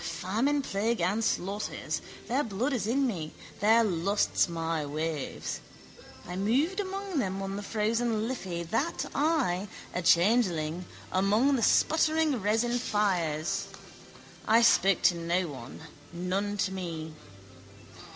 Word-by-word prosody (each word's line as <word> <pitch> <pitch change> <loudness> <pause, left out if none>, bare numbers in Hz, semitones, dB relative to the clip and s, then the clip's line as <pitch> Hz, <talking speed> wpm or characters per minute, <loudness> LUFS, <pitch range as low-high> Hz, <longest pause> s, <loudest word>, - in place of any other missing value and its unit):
Famine, 240 +12 0
plague 220 +1 -1
and 195 +6 +1
slaughters. 200 0 -2 0.3
Their 265 +5 +1
blood 230 +5 -1
is 225 -5 -1
in 270 +4 +2
me, 170 -11 -3 0.3
their 225 +3 +5
lusts 195 -1 +1
my 165 -2 -2
waves. 155 0 -3 0.7
I 180 - -6
moved 265 - +1
among 390 -3 -3
them 195 -5 -1
on 195 0 -4
the 205 - -4
frozen 220 +1 0
Liffey, 185 -9 -4
that 230 - -1
I, 275 - +1 0.3
a 180 - -1
changeling, 175 -3 +2 0.3
among 210 +9 +3
the 245 - 0
spluttering 315 -2 +3
resin 225 +4 +1
fires. 180 -9 0 0.8
I 225 +2 +5
spoke 195 -5 +4
to 175 - +5
no 170 +2 0
one: 130 -2 -9 0.3
none 190 +4 -2
to 190 - -4
me. 165 -4 -5
205 Hz, 125 wpm, -29 LUFS, 175-240 Hz, 0.8 s, their